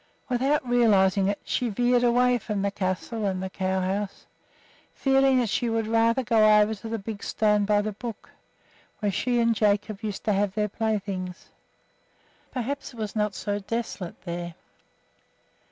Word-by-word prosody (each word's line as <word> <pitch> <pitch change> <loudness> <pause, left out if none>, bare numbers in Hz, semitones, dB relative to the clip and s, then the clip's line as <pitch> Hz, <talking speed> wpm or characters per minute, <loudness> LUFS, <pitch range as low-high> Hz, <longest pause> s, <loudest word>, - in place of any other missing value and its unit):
Without 265 +2 +1
realizing 200 -5 +4
it 200 0 -1
she 245 - -1
veered 245 +3 +2
away 245 +1 +3
from 210 -3 -3
the 200 - 0
castle 200 +3 -3
and 190 -1 -2
the 190 - -5
cow 190 0 -1
house, 195 +2 -3 0.7
feeling 270 -1 +3
that 245 -2 +2
she 235 +4 0
would 225 -1 0
rather 230 +3 +2
go 215 -2 +5
over 210 +1 +3
to 220 +2 -8
the 225 - -2
big 210 0 -6
stone 210 -1 +1
by 205 0 +2
the 215 - -2
brook, 225 +2 -8 0.7
where 205 -2 -1
she 240 +5 0
and 230 0 +3
Jacob 205 -1 0
used 210 -3 -4
to 215 - +1
have 195 -1 0
their 210 -1 0
playthings. 195 -4 -3 1.0
Perhaps 275 +1 -4
it - - -14
was 215 -1 -4
not 210 -2 0
so 205 -1 -2
desolate 205 -4 -5
there. 170 -1 -5
215 Hz, 165 wpm, -26 LUFS, 200-235 Hz, 1.0 s, go